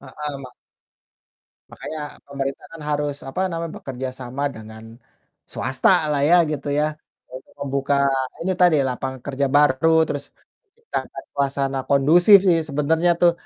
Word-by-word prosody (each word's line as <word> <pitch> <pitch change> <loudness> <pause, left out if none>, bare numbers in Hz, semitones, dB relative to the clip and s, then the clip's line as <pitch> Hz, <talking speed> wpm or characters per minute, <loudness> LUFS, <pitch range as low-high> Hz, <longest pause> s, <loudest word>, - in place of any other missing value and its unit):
Heeh, 145 +2 -7
ma 130 - -10 1.2
makanya 155 - -7 0.3
pemerintah 140 -1 -4
kan 165 - -10
harus 145 -1 -1
apa 135 - -4
namanya, 165 -1 -4
bekerja 130 -1 -5
sama 130 +3 -5
dengan 110 0 -11 0.7
swasta 130 0 0 0.2
lah 145 -1 +1
ya, 175 - +7
gitu 145 -2 -4
ya, 150 - +2 0.5
untuk 130 +1 -11
membuka 140 0 -1 0.5
ini 190 +2 0
tadi, 175 -3 +5
lapangan 130 +1 -4
kerja 140 0 -1
baru, 145 +2 +4 0.2
terus 145 -1 -4 0.5
menciptakan 465 0 -6
suasana 140 -1 -1
kondusif 170 +9 +6
sih 170 -2 +4
sebenarnya 160 +4 +1
tuh, 175 -1 +5
140 Hz, 135 wpm, -22 LUFS, 135-160 Hz, 1.2 s, ya